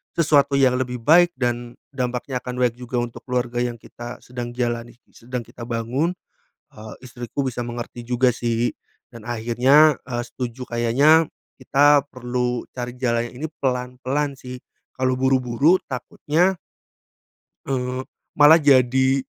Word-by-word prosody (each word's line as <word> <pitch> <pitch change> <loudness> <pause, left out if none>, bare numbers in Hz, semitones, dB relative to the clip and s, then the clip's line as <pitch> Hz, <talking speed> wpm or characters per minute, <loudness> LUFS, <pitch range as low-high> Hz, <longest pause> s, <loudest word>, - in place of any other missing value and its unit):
sesuatu 145 -4 +3
yang 130 -2 +4
lebih 125 -1 -3
baik 175 +6 +5
dan 120 -1 -2 0.2
dampaknya 125 0 -3
akan 125 0 -5
baik 120 -2 +1
juga 125 0 -6
untuk 120 -1 -8
keluarga 120 -1 -1
yang 120 -1 -3
kita 120 +2 -9
sedang 120 -1 -6
jalani, 120 -1 -3 0.2
sedang 125 +1 -6
kita 120 - -11
bangun, 125 +9 -1 0.6
eee, 110 0 -10
istriku 120 +2 -5
bisa 125 -2 -4
mengerti 120 0 -6
juga 125 +1 +3
sih 120 0 -1 0.4
dan 115 -3 -12
akhirnya, 125 +6 +4
eee, 120 -2 -3
setuju 125 0 -6
kayaknya 140 +7 +4 0.3
kita 145 +1 +4
perlu 125 -1 -2
cari 125 -1 -5
jalan 120 -2 0
yang - - -16
ini - - -2
pelan-pelan 130 +2 -1
sih. 125 -1 -9 0.4
Kalau 130 0 +1
buru-buru 130 +5 +3
takutnya 155 +8 0 1.1
eee 130 -1 -2 0.3
malah 150 +2 +7
jadi 130 -1 +4
125 Hz, 135 wpm, -22 LUFS, 120-135 Hz, 1.1 s, malah